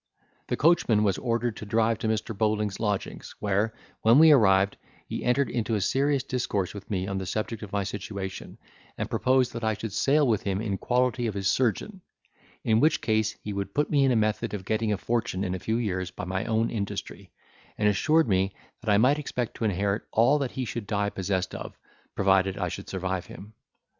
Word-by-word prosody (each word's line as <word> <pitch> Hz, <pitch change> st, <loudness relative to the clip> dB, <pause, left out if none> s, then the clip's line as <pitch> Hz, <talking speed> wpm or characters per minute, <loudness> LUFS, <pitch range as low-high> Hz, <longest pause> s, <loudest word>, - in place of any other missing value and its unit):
The -, -, -1 dB
coachman 145 Hz, -10 st, +3 dB
was 100 Hz, -3 st, +1 dB
ordered 120 Hz, -2 st, -1 dB
to -, -, -7 dB
drive 110 Hz, 0 st, +1 dB
to 110 Hz, -, -2 dB
Mr. 110 Hz, 0 st, -1 dB
Bowling's 105 Hz, -1 st, 0 dB
lodgings, 105 Hz, -3 st, -3 dB
where, 105 Hz, +2 st, 0 dB, 0.3 s
when 115 Hz, +3 st, +6 dB
we 160 Hz, +1 st, +8 dB
arrived, 100 Hz, -7 st, +4 dB, 0.3 s
he -, -, -5 dB
entered 125 Hz, +2 st, +2 dB
into 115 Hz, -1 st, -1 dB
a -, -, +1 dB
serious 140 Hz, +4 st, +1 dB
discourse 120 Hz, -8 st, -2 dB
with 100 Hz, -1 st, -10 dB
me, 95 Hz, -3 st, -1 dB
on 95 Hz, 0 st, -3 dB
the 95 Hz, -, -5 dB
subject 110 Hz, +2 st, -3 dB
of 105 Hz, -3 st, -8 dB
my 100 Hz, -1 st, 0 dB
situation, 100 Hz, -1 st, -6 dB, 0.4 s
and -, -, -4 dB
proposed 130 Hz, -1 st, +2 dB
that 115 Hz, 0 st, -5 dB
I 110 Hz, -1 st, +1 dB
should 110 Hz, -1 st, -6 dB
sail 145 Hz, +6 st, +3 dB
with 110 Hz, -4 st, +2 dB
him 95 Hz, -1 st, -1 dB
in 100 Hz, -3 st, -2 dB
quality 125 Hz, 0 st, +1 dB
of 105 Hz, -, -3 dB
his 95 Hz, -1 st, -1 dB
surgeon; 130 Hz, -, 0 dB, 0.6 s
in 110 Hz, -1 st, +3 dB
which 155 Hz, +5 st, +3 dB
case 110 Hz, -1 st, 0 dB
he 105 Hz, -, -4 dB
would 100 Hz, 0 st, -4 dB
put 150 Hz, 0 st, +1 dB
me 145 Hz, -2 st, +4 dB
in 135 Hz, -, +4 dB
a -, -, +2 dB
method 110 Hz, 0 st, 0 dB
of 95 Hz, -2 st, -7 dB
getting 110 Hz, +1 st, 0 dB
a 105 Hz, -, +1 dB
fortune 115 Hz, -4 st, -1 dB
in 90 Hz, -2 st, -2 dB
a 95 Hz, -, -3 dB
few 110 Hz, +5 st, -1 dB
years 95 Hz, -6 st, -2 dB
by 90 Hz, -, -7 dB
my 95 Hz, +1 st, -2 dB
own 115 Hz, 0 st, +1 dB
industry; 100 Hz, -4 st, -5 dB, 0.5 s
and 105 Hz, -, +2 dB
assured 155 Hz, +10 st, +3 dB
me, 95 Hz, -1 st, +1 dB, 0.3 s
that 115 Hz, -3 st, 0 dB
I 100 Hz, -, +5 dB
might 130 Hz, +7 st, +4 dB
expect 125 Hz, -5 st, -3 dB
to 115 Hz, -, -2 dB
inherit 100 Hz, +1 st, 0 dB
all 130 Hz, +7 st, +4 dB
that 135 Hz, -3 st, -1 dB
he 130 Hz, 0 st, -4 dB
should 115 Hz, -2 st, -5 dB
die 105 Hz, -1 st, 0 dB
possessed 95 Hz, -1 st, -2 dB
of, -, -, -7 dB, 0.4 s
provided 95 Hz, 0 st, +2 dB
I 90 Hz, -2 st, -1 dB
should 100 Hz, -, -7 dB
survive 95 Hz, -1 st, -3 dB
him. 105 Hz, +2 st, -11 dB
110 Hz, 210 wpm, -27 LUFS, 100-120 Hz, 0.6 s, we